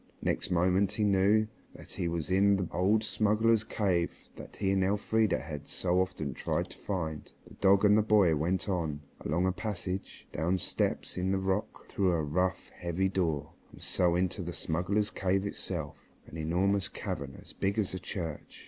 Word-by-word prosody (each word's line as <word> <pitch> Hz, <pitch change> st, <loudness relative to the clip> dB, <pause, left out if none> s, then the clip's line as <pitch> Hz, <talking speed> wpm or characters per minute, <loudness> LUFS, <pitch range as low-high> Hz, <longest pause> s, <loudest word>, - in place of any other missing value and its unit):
Next -, -, 0 dB
moment 90 Hz, +2 st, +2 dB
he 110 Hz, -, 0 dB
knew 100 Hz, +2 st, +4 dB, 0.3 s
that -, -, -11 dB
he 85 Hz, -, -2 dB
was 85 Hz, 0 st, -2 dB
in 100 Hz, +2 st, +5 dB
the 95 Hz, -3 st, -1 dB
old 100 Hz, +5 st, +2 dB
smugglers' 110 Hz, +1 st, +2 dB
cave 95 Hz, -6 st, -1 dB
that -, -, -10 dB
he 95 Hz, -2 st, 0 dB
and 95 Hz, -1 st, +2 dB
Elfrida 105 Hz, +3 st, +2 dB
had 75 Hz, -2 st, -7 dB
so 90 Hz, 0 st, +1 dB
often 80 Hz, -7 st, -3 dB
tried -, -, -2 dB
to -, -, -10 dB
find. 80 Hz, -6 st, -4 dB
The -, -, -15 dB
dog 100 Hz, +1 st, +4 dB
and 105 Hz, 0 st, +6 dB
the 110 Hz, -, +5 dB
boy 105 Hz, -6 st, +4 dB
went 90 Hz, +7 st, 0 dB
on, 80 Hz, -6 st, -1 dB, 0.2 s
along 85 Hz, +5 st, 0 dB
a 95 Hz, -, +3 dB
passage, 95 Hz, -2 st, -5 dB
down 85 Hz, +4 st, 0 dB
steps -, -, 0 dB
cut 90 Hz, -, -3 dB
in 95 Hz, +1 st, 0 dB
the 95 Hz, -, +2 dB
rock, 95 Hz, +2 st, -2 dB
through 95 Hz, -3 st, +1 dB
a 80 Hz, -2 st, 0 dB
rough, 90 Hz, +5 st, -1 dB
heavy 90 Hz, +2 st, -1 dB
door, 85 Hz, -7 st, -1 dB, 0.2 s
and -, -, -14 dB
so 90 Hz, -1 st, +1 dB
into 90 Hz, +2 st, 0 dB
the 90 Hz, 0 st, -5 dB
smugglers' 100 Hz, +7 st, 0 dB
cave 95 Hz, +1 st, 0 dB
itself, 85 Hz, -6 st, -4 dB, 0.2 s
an -, -, -12 dB
enormous 90 Hz, +5 st, +1 dB
cavern 70 Hz, -1 st, -5 dB
as -, -, -12 dB
big 100 Hz, +2 st, -1 dB
as 105 Hz, -4 st, +1 dB
a 95 Hz, -, -3 dB
church. 80 Hz, -7 st, -6 dB
95 Hz, 185 wpm, -30 LUFS, 85-100 Hz, 0.3 s, and